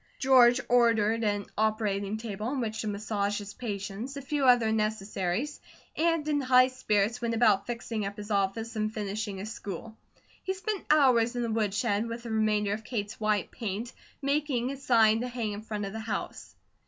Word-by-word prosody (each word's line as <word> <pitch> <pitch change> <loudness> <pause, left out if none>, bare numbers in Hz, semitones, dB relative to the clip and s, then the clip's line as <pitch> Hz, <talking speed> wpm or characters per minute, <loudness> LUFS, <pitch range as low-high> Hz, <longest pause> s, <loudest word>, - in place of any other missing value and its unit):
George 255 -2 +6
ordered 230 -2 +3
an 205 -1 0
operating 215 -1 0
table, 215 -1 -5
on 270 +2 -2
which 220 -2 -2
to 215 - -4
massage 205 0 -1
his 205 -1 -7
patients, 215 +3 -5
a - - -5
few 280 0 0
other 245 -3 +5
necessities, 215 +3 -1 0.3
and 330 -1 +1
in 295 -1 +1
high 255 -1 +5
spirits, 225 -2 0
went 230 -1 -1
about 215 -4 +3
fixing 235 -2 -3
up 200 +1 -5
his 210 +1 -7
office 205 +3 -1
and 215 0 -1
finishing 210 -1 -4
his 205 +3 -6
school. 210 +3 -7 0.5
He 380 - -2
spent 405 +1 -4
hours 255 -6 +4
in 245 - -1
the 230 - -2
woodshed 215 0 0
with 230 +1 -6
the 235 - -6
remainder 210 -2 +1
of 220 +2 -5
Kate's 210 -3 -4
white 215 -3 0
paint, 225 +2 -4 0.3
making 275 -3 0
a 275 - -6
sign 225 -4 +4
to 250 - -2
hang 240 -3 -3
in 205 +1 -6
front 210 -2 -4
of 195 - -6
the 220 - -4
house. 220 +1 -5
220 Hz, 185 wpm, -29 LUFS, 205-245 Hz, 0.5 s, George